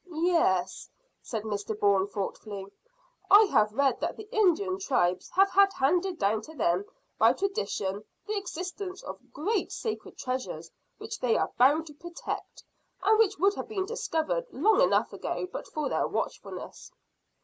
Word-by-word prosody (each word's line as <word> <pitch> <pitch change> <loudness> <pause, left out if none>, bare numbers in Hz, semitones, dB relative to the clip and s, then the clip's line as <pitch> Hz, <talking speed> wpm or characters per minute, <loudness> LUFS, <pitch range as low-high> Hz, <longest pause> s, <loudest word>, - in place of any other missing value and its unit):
"Yes," 315 - +1 0.3
said 220 -3 -4
Mr 210 0 -4
Bourne 200 -1 +3
thoughtfully, 200 0 -5 0.6
"I 415 +2 +9
have 215 - +3
read 270 -2 +2
that - - -2
the 435 - -9
Indian 380 -2 +2
tribes 185 - 0
have 390 +1 +3
had 395 +1 +5
handed 350 +6 +1
down 210 +2 +1
to 315 +8 -12
them 180 - +1 0.3
by 225 +2 +6
tradition 260 - -2 0.2
the 430 - -2
existence 370 0 -5
of - - -10
great 400 +7 -1
sacred 440 -2 -5
treasures 255 0 -4 0.3
which - - -7
they 245 -3 +2
are - - -1
bound 290 +6 +4
to 300 - -11
protect, 340 +4 -7 0.4
and 430 +2 +4
which 445 -4 +3
would 395 +5 +3
have - - -6
been 400 -4 -2
discovered 465 +3 -2
long 440 +1 +3
enough - - +3
ago - - -3
but - - -5
for 305 -3 -3
their - - 0
watchfulness." - - -5
325 Hz, 155 wpm, -28 LUFS, -, 0.6 s, I